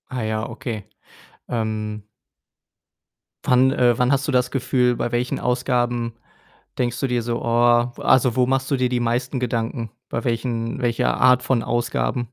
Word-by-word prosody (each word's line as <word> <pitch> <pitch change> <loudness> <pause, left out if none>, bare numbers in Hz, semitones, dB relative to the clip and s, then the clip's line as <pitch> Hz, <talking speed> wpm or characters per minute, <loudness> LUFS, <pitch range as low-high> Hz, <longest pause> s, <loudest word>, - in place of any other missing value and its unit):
Ah 125 -3 -3
ja, 110 0 -2
okay. 115 -3 -6 0.6
Ähm 110 -2 -3 1.4
wann 130 +1 +4
äh, 120 -3 +3
wann 125 +1 +2
hast 140 0 +1
du - - 0
das 125 -1 +1
Gefühl, 125 -2 +1
bei 120 - -2
welchen 120 +2 -1
Ausgaben 120 -1 0 0.7
denkst 120 -1 -1
du 135 - +1
dir 125 -2 0
so: 115 0 -2
„Oh“, 120 +1 +3
w - - -9
also 125 -2 +4
wo 125 -1 +3
machst 135 +2 0
du 140 - +2
dir 130 -1 +1
die 125 -1 -1
meisten 125 +2 -1
Gedanken? 115 -1 -2 0.2
Bei 115 - -3
welchen 115 -1 -2
welcher 120 -2 0
Art 125 0 +5
von 125 -2 +1
Ausgaben? 120 0 -1
120 Hz, 165 wpm, -22 LUFS, 115-125 Hz, 1.4 s, Art